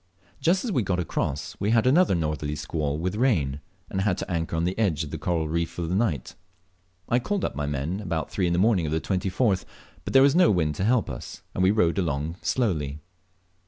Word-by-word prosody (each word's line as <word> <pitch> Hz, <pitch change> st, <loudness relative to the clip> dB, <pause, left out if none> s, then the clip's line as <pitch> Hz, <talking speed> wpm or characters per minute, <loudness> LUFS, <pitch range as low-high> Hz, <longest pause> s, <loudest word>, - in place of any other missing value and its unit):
Just 180 Hz, +7 st, +2 dB
as 235 Hz, -, -1 dB
we 125 Hz, -, +2 dB
got 90 Hz, -3 st, -1 dB
across 85 Hz, +2 st, -2 dB
we 100 Hz, -, 0 dB
had 115 Hz, 0 st, +3 dB
another 150 Hz, -, +4 dB
northerly 75 Hz, -2 st, -2 dB
squall 75 Hz, -1 st, -2 dB
with 90 Hz, +4 st, -2 dB
rain, 75 Hz, -, +1 dB, 0.3 s
and 95 Hz, -, -2 dB
had 95 Hz, -2 st, +1 dB
to -, -, -5 dB
anchor 80 Hz, -1 st, -1 dB
on 80 Hz, -, 0 dB
the 90 Hz, +2 st, 0 dB
edge 85 Hz, -8 st, +1 dB
of 75 Hz, -, -8 dB
a -, -, -2 dB
coral 80 Hz, -3 st, 0 dB
reef 85 Hz, +1 st, -1 dB
for 85 Hz, -, -5 dB
the 85 Hz, +2 st, -2 dB
night. 95 Hz, -, 0 dB, 0.7 s
I 120 Hz, -, +2 dB
called 200 Hz, +9 st, -1 dB
up -, -, -2 dB
my 75 Hz, 0 st, -2 dB
men 75 Hz, +6 st, -2 dB
about 85 Hz, -7 st, -3 dB
three 95 Hz, -3 st, 0 dB
on 85 Hz, -, +1 dB
the -, -, +1 dB
morning 95 Hz, -4 st, +3 dB
of -, -, -3 dB
the 80 Hz, -, +1 dB
24th, 95 Hz, +3 st, 0 dB, 0.4 s
but -, -, -5 dB
there 135 Hz, 0 st, +7 dB
was 140 Hz, 0 st, +5 dB
no 180 Hz, -1 st, +6 dB
wind 80 Hz, -6 st, +2 dB
to 95 Hz, +6 st, -2 dB
help 120 Hz, -1 st, +2 dB
us, -, -, -8 dB
and -, -, -2 dB
we 95 Hz, -, +5 dB
rowed 100 Hz, -4 st, +2 dB
along 80 Hz, -1 st, -2 dB
slowly. 80 Hz, -, 0 dB
90 Hz, 230 wpm, -26 LUFS, 80-110 Hz, 0.7 s, there